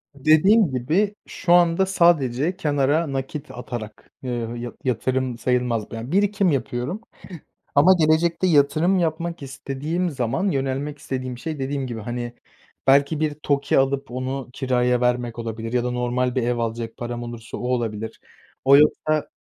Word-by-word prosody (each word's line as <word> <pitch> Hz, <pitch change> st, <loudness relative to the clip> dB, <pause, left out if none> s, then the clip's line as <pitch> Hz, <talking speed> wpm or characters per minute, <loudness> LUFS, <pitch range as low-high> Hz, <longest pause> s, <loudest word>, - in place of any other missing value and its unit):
Dediğim 155 Hz, +7 st, +4 dB
gibi, 160 Hz, -, 0 dB
şu 175 Hz, -, 0 dB
anda 175 Hz, +1 st, +4 dB
sadece 170 Hz, -4 st, +2 dB
kenara 145 Hz, -1 st, +1 dB
nakit 135 Hz, +3 st, -5 dB
atarak, 120 Hz, -3 st, -8 dB
ııı, 120 Hz, -2 st, -3 dB
yı 120 Hz, 0 st, -6 dB
yatırım 130 Hz, -1 st, -1 dB
sayılmaz. 125 Hz, -3 st, -1 dB
Ben 115 Hz, +3 st, -6 dB
birikim 200 Hz, -1 st, +2 dB
yapıyorum 135 Hz, -, -2 dB, 0.7 s
ama 160 Hz, +7 st, +7 dB
gelecekte 165 Hz, +3 st, +2 dB
yatırım 155 Hz, +4 st, +3 dB
yapmak 170 Hz, 0 st, -2 dB
istediğim 140 Hz, +6 st, -3 dB
zaman, 135 Hz, -, -1 dB
yönelmek 135 Hz, +1 st, -2 dB
istediğim 130 Hz, -2 st, -5 dB
şey, 155 Hz, +3 st, -5 dB
dediğim 135 Hz, 0 st, -2 dB
gibi, 115 Hz, -2 st, -5 dB
hani, 120 Hz, +2 st, -4 dB, 0.5 s
belki 140 Hz, +3 st, +4 dB
bir 155 Hz, -1 st, 0 dB
TOKİ 145 Hz, -1 st, 0 dB
alıp 135 Hz, -1 st, 0 dB
onu 130 Hz, +1 st, -4 dB
kiraya 125 Hz, -2 st, +1 dB
vermek 125 Hz, -1 st, 0 dB
olabilir 115 Hz, 0 st, -5 dB
ya 125 Hz, -1 st, +2 dB
da 125 Hz, -, -1 dB
normal 125 Hz, +1 st, -1 dB
bir 130 Hz, -, +1 dB
ev 120 Hz, 0 st, 0 dB
alacak 115 Hz, 0 st, -3 dB
param 120 Hz, 0 st, -5 dB
olursa 120 Hz, -1 st, -7 dB
o 125 Hz, -, -4 dB
olabilir. 110 Hz, -3 st, -2 dB, 0.5 s
O 140 Hz, +1 st, +8 dB
yoksa 150 Hz, 0 st, +2 dB
135 Hz, 145 wpm, -23 LUFS, 120-155 Hz, 0.7 s, O